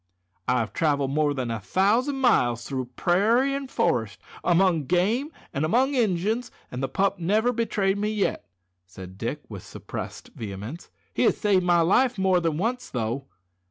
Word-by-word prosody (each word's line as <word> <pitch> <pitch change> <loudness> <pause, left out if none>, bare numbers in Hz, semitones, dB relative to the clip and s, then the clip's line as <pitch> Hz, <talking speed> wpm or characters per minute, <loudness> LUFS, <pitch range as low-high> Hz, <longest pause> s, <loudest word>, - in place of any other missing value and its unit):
"I 125 - +3
have 110 -3 -5
travelled 145 -4 +1
more 150 0 +2
than 125 -3 -2
a 115 - -2
thousand 215 - +1
miles 120 - +3
through 130 -2 -3
prairie 225 +10 +2
and 275 -1 -4
forest, 110 - 0 0.2
among 175 -3 +3
game 210 - +1 0.2
an' 140 - -1
among 250 - +2
Injuns, 220 0 0 0.2
an' 125 - -5
the 135 0 -2
pup 195 +7 0
never 215 +8 +2
betrayed 205 -4 0
me 210 +1 0
yet," 205 - -1 0.4
said 95 0 -11
Dick, - - -3
with - - -8
suppressed - - -8
vehemence. 105 - -7 0.2
"He - - -1
has - - +3
saved 200 -4 +2
my 175 -1 +4
life 240 +9 +3
more 190 -1 +3
than 165 -3 -1
once 235 +7 -2
though." 120 +3 -3
180 Hz, 165 wpm, -25 LUFS, 135-220 Hz, 0.4 s, my